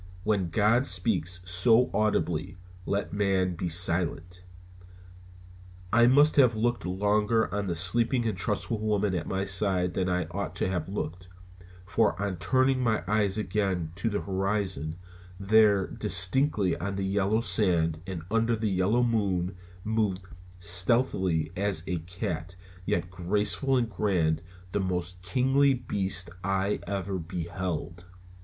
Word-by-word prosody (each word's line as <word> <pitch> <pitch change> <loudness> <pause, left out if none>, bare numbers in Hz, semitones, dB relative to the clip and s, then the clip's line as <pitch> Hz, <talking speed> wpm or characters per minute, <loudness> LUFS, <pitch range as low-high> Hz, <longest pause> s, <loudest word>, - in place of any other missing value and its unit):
When 100 -4 0
God 110 +8 +2
speaks 90 -1 +1
so 110 +8 +3
audibly 95 -4 -1 0.3
let 100 0 -2
man 95 -3 +1
be 90 +1 -3
silent. 90 +1 +1 1.5
I 120 +1 +6
must 145 +5 +5
have 125 -5 +5
looked 115 -4 -1
longer 105 +2 +1
on 100 -1 -2
the 85 - -2
sleeping 115 +8 +1
and 110 - -1
trustful 105 +4 -2
woman 105 -2 0
at 85 -3 -3
my 95 0 -1
side 95 -2 +1
than 95 -1 -1
I 90 -1 0
ought 100 +3 -4
to - - -1
have 90 -2 -3
looked, 90 -2 -5 0.6
for 110 +2 +1
on 100 -3 -2
turning 130 +7 +2
my 110 -6 0
eyes 105 -1 +1
again 95 -6 -1
to 115 - -1
the 105 - -2
horizon, 95 -5 -1 0.4
there 100 -1 +4
distinctly 100 - +2
on 100 +1 -3
the 95 0 -2
yellow 100 +3 +1
sand 90 -6 +1
and 90 -4 -5
under 115 +1 +2
the 110 -2 -2
yellow 95 +6 +2
moon 100 -6 0 0.3
moved, 105 -4 -1 0.3
stealthily 90 -2 +2
as 100 -3 0
a 90 -2 -2
cat, 90 0 -5 0.3
yet 90 +1 -1
graceful 105 +9 0
and 120 -2 +1
grand, 90 -7 0 0.3
the 100 - -1
most 90 -1 -3
kingly 135 +8 +2
beast 95 -6 -2
I 95 +1 0
ever 95 -1 -3
beheld. 85 0 -5
95 Hz, 135 wpm, -27 LUFS, 90-110 Hz, 1.5 s, I